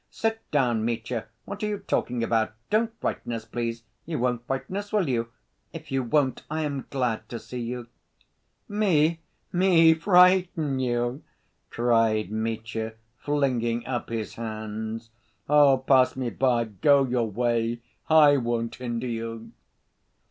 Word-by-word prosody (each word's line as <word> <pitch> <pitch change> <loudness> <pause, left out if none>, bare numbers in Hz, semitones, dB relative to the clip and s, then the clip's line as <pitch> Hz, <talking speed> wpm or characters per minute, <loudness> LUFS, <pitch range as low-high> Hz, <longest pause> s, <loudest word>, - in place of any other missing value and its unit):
Sit 225 0 -1
down, 120 -6 +1
Mitya, 115 0 -3 0.2
what 200 0 -7
are 210 - 0
you 210 -1 -2
talking 125 -9 -1
about? 110 -1 +1 0.2
Don't 220 +2 +2
frighten 120 - -3
us, 115 -1 -5
please. 115 0 -4 0.2
You 165 - -2
won't 120 -1 -1
frighten 135 +6 -3
us, 205 0 -5
will 205 -6 +1
you? 115 -3 0 0.5
If 160 -3 -9
you 135 0 +1
won't, 130 +2 +1
I 155 +1 -2
am 140 -3 -3
glad 125 -5 -2
to 120 - -5
see 125 +2 -7
you 120 0 -4 0.5
..." - - -48
"Me, 170 -6 +2 0.3
me 175 -3 +6
frighten 180 -4 +4
you?" 120 +1 -1 0.5
cried 115 -3 +2
Mitya, 110 0 -3 0.3
flinging 125 -5 0
up 125 -2 -3
his 115 -2 -4
hands. 110 0 -5 0.4
"Oh, 145 -2 +6
pass 130 0 +3
me 125 -3 -2
by, 125 -3 +2
go 135 +7 +3
your 120 -3 0
way, 120 +1 0 0.3
I 150 -3 +7
won't 120 -2 -1
hinder 120 -1 -3
you!..." 115 -1 -5
125 Hz, 145 wpm, -26 LUFS, 115-150 Hz, 0.5 s, I